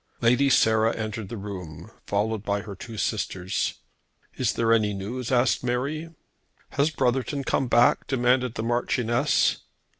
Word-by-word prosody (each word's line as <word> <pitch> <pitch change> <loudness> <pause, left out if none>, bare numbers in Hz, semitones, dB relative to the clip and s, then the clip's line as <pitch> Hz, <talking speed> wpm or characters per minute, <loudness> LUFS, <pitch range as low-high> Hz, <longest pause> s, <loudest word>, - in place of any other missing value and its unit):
Lady 125 +4 +3
Sarah 110 -2 +3
entered 110 -2 -4
the 115 - -5
room, 90 -3 -8 0.2
followed 105 +1 0
by 100 -1 -1
her 105 -1 -8
two 110 +4 -9
sisters. 95 -4 -2 0.6
"Is 125 -4 0
there 115 0 +2
any 105 -3 +2
news?" 115 +6 -5
asked 125 0 +2
Mary. 140 +7 -2 0.6
"Has 140 +2 +2
Brotherton 135 0 -1
come 135 - 0
back?" 120 0 +3
demanded 125 -1 +1
the 110 - -3
Marchioness. 120 +3 +1
115 Hz, 140 wpm, -25 LUFS, 105-125 Hz, 0.6 s, Lady